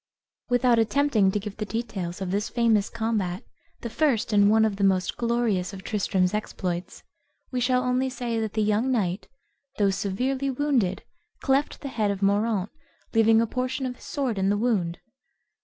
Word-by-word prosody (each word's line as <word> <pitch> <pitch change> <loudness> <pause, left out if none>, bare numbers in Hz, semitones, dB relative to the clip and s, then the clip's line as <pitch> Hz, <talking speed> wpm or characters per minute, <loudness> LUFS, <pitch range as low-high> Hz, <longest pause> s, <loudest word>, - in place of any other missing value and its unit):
Without 245 -1 +3
attempting 225 -3 +3
to 190 - 0
give 205 0 -7
the 215 - -3
details 200 -6 -4
of 185 -1 -3
this 205 +2 -1
famous 225 -4 +2
combat, 220 -6 -2 0.4
the 235 - -4
first 245 -6 +1
and 205 0 +5
one 220 +1 +5
of 205 -3 -1
the 200 - -1
most 190 -1 +2
glorious 230 -6 0
of 190 -1 -9
Tristram's 190 -3 0
exploits, 185 -4 -4 0.5
we 255 - -1
shall 250 +1 +2
only 255 +1 +1
say 240 -3 -3
that 220 -2 -3
the 215 - +1
young 215 +5 +1
knight, 190 -5 -1 0.5
though 200 -2 +3
severely 250 +8 -1
wounded, 255 -9 0 0.4
cleft 275 +2 0
the 280 - -5
head 215 -5 0
of 200 0 -2
Moraunt, 205 0 +1 0.4
leaving 225 0 +5
a - - +2
portion 255 +3 -2
of 250 -1 -4
his - - -15
sword 255 -8 -2
in 190 0 +2
the 205 - +2
wound. 205 -7 0
220 Hz, 175 wpm, -25 LUFS, 195-245 Hz, 0.5 s, and